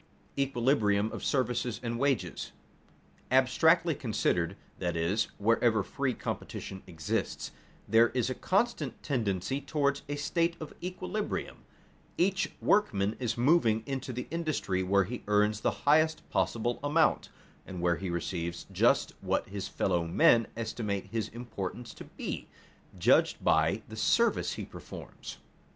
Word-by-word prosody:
[Sidenote: - - -6
Equilibrium 110 -5 +2
of - - -6
services 120 -3 0
and 115 0 -2
wages] 140 -3 -1 0.8
Abstractly 160 +6 +4
considered, 100 - 0 0.2
that 90 -2 -1
is, 90 +7 +1
wherever 110 0 +3
free 135 +3 -2
competition 95 0 -5
exists, 80 -4 -3 0.4
there 115 +1 +5
is 125 -2 0
a 130 - -1
constant 185 - -1
tendency 120 - -1
toward 140 0 0
a 145 - -1
state 170 +3 0
of 155 - -7
equilibrium; 185 +4 -3 0.6
each 190 +2 +1
workman 105 - +2
is 120 -3 -1
moving 120 -5 +3
into 135 -1 -4
the 125 0 -4
industry 155 - -1
where 100 +1 +3
he 120 +6 -6
earns 105 0 +2
the - - +2 0.2
highest 155 +2 +3
possible 120 +1 0
amount, 155 +2 +2 0.4
and 90 - -6
where 85 -1 +2
he 95 - -4
receives 85 0 -3
just - - +3
what - - 0
his 95 -1 -4
fellow 85 -3 0
men 115 +6 +5
estimate 110 -3 -3
his 115 -2 -1
importance 115 -1 -6
to - - -10
be, - - -6 0.5
judged - - +3
by 105 +3 +3
the 110 - -9
service 230 - +2
he - - -5
performs. - - -10
115 Hz, 135 wpm, -30 LUFS, 100-140 Hz, 0.8 s, there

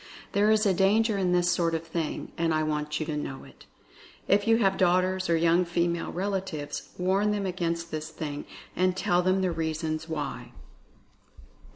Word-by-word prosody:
There 205 +1 +3
is 215 0 +4
a 195 - +4
danger 210 +4 +3
in 185 -2 +1
this 175 0 +3
sort 170 -2 +1
of 165 0 -4
thing, 165 -2 -4
and 165 -1 +1
I 155 - +1
want 150 0 -2
you 155 - -2
to 155 -1 -3
know 140 -2 -5
it. - - -17 0.6
If 205 +2 +3
you 225 0 +5
have 195 -4 +2
daughters, 185 0 +2
or 165 - +4
young 170 +2 +3
female 170 0 -1
relatives, 190 -5 -3
warn 190 +3 +2
them 205 -1 -1
against 170 -2 -2
this 155 0 -4
thing, 150 -2 -5 0.3
and 185 0 +1
tell 175 -1 +2
them 185 +1 +2
the 185 -1 +1
reason 160 -1 -2
why. 135 -6 -5
175 Hz, 180 wpm, -27 LUFS, 160-190 Hz, 0.6 s, you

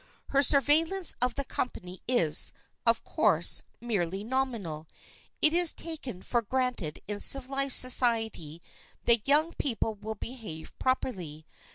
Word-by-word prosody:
Her 275 - +2
surveillance 310 +7 +2
of 250 -1 0
the 280 - -3
company 185 -9 -6
is, 175 -12 +2 0.4
of - - +2
course, - - +1 0.2
merely 195 -5 -4
nominal. 220 -11 -4 0.6
It 310 - +7
is 345 -1 +5
taken 270 - -7
for 240 - -1
granted 245 -8 -4
in 205 0 -5
civilized 275 +1 +5
society 225 - +3 0.4
that 235 -1 +1
young 310 +4 +2
people 225 -4 -2
will 215 +1 -8
behave 210 -10 -9
properly. 180 - -4
240 Hz, 125 wpm, -27 LUFS, 195-275 Hz, 0.6 s, It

